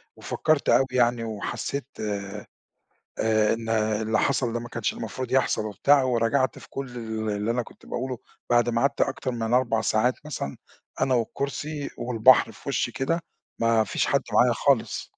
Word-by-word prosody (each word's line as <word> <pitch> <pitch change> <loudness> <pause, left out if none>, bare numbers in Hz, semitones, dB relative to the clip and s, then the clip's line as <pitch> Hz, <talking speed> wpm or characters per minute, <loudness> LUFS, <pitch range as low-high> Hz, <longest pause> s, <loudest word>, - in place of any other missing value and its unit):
وفكّرت 155 -2 0
أوي 135 - +5
يعني 120 -2 +2
وحسّيت 115 +4 -4 0.2
آآ 100 -1 -4 1.1
إن 115 0 -7
اللي 110 0 +1
حصَل 130 -4 +1
ده 120 - -2
ما 120 - -8
كانش 120 -2 -2
المفروض 120 +3 -5
يحصَل 130 -4 +2
وبتاع 135 +7 +3
ورجعَت 125 +1 +1
في - - -14
كلّ 135 -2 -5
ال 110 -1 -3
اللي 105 +2 -1
أنا 120 +1 0
كنت - - -16
باقوله 130 -1 -4 0.3
بعد 120 0 +4
ما 115 0 +1
قعَدت 140 - +1
أكتر 135 -1 0
من 115 -1 -1
4 120 -3 +2
ساعات 110 +3 +2
مثلًا 70 - -4 0.4
أنا 130 - +2
والكرسي 140 +5 -3
والبحر 120 0 +4
في 110 - -11
وِشّي 125 -3 0
كده 165 +8 -1 0.4
ما 115 -1 +3
فيش - - -1
حد - - +2
معايا - - +5
خالص. - - +1
120 Hz, 160 wpm, -25 LUFS, 110-130 Hz, 1.1 s, أوي